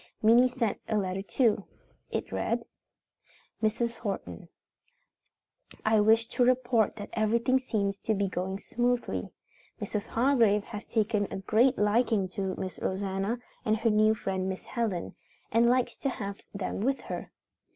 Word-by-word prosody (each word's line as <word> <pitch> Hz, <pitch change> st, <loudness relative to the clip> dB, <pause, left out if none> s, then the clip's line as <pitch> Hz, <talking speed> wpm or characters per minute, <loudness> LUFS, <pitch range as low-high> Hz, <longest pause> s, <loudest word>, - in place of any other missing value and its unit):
Minnie 235 Hz, +3 st, +7 dB
sent 240 Hz, -4 st, -1 dB
a 215 Hz, -, +2 dB
letter 190 Hz, -1 st, -1 dB
too. 210 Hz, 0 st, +1 dB, 0.5 s
It -, -, -3 dB
read: -, -, -1 dB, 1.0 s
"Mrs. 230 Hz, +2 st, 0 dB
Horton: 190 Hz, -, -5 dB, 1.4 s
"I 220 Hz, 0 st, +4 dB
wish 220 Hz, +2 st, +5 dB
to 250 Hz, -, +2 dB
report 245 Hz, -3 st, +2 dB
that 205 Hz, -2 st, -8 dB
everything 235 Hz, +4 st, +2 dB
seems 200 Hz, -6 st, -1 dB
to 220 Hz, -, 0 dB
be 200 Hz, 0 st, 0 dB
going 190 Hz, +1 st, -3 dB
smoothly. 245 Hz, +3 st, -1 dB, 0.5 s
Mrs. 205 Hz, -1 st, -3 dB
Hargrave 230 Hz, -5 st, +3 dB
has 210 Hz, -1 st, -8 dB
taken 215 Hz, -2 st, +1 dB
a -, -, -3 dB
great 230 Hz, +7 st, +3 dB
liking 210 Hz, -1 st, +2 dB
to 190 Hz, 0 st, -3 dB
Miss 185 Hz, -1 st, -5 dB
Rosanna, 195 Hz, +3 st, -1 dB, 0.3 s
and 215 Hz, 0 st, +2 dB
her 225 Hz, +1 st, +2 dB
new 215 Hz, +1 st, +4 dB
friend 190 Hz, -2 st, -2 dB
Miss 190 Hz, -, -5 dB
Helen, 220 Hz, -8 st, -2 dB, 0.4 s
and 230 Hz, +2 st, +4 dB
likes 250 Hz, 0 st, +2 dB
to 275 Hz, -, -1 dB
have 200 Hz, -6 st, -5 dB
them 200 Hz, -1 st, -4 dB
with 265 Hz, +6 st, 0 dB
her. -, -, -6 dB
215 Hz, 145 wpm, -29 LUFS, 200-235 Hz, 1.4 s, Minnie